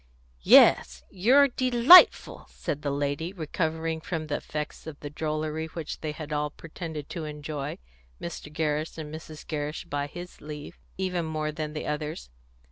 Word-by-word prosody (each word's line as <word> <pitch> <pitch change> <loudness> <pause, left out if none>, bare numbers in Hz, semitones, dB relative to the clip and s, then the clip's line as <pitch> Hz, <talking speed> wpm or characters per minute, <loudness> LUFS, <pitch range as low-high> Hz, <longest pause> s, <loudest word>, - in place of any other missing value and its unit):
"Yes, - - +6
you're 255 +10 +5
delightful," 255 +6 +6
said 150 - -4
the 145 - -2
lady, 145 +5 -2
recovering 160 -1 -2
from 160 -1 -4
the 150 -1 -2
effects 150 +1 -6
of 150 -2 -8
the 145 - -7
drollery 155 +1 -3
which 160 -1 -7
they 155 - -3
had 150 0 -7
all 150 0 0
pretended 160 -1 -8
to 165 -3 -5
enjoy, 150 -1 -5 0.4
Mr. 165 -3 -7
Gerrish, 155 0 -2
and 155 -1 -7
Mrs. 155 -1 -9
Gerrish 150 +1 -4
by 145 -2 -2
his 175 +4 -10
leave, 150 0 -9 0.2
even 180 -3 -1
more 155 -1 -2
than 150 0 -5
the 155 - -5
others. 150 - -4
155 Hz, 155 wpm, -27 LUFS, 150-165 Hz, 0.4 s, Yes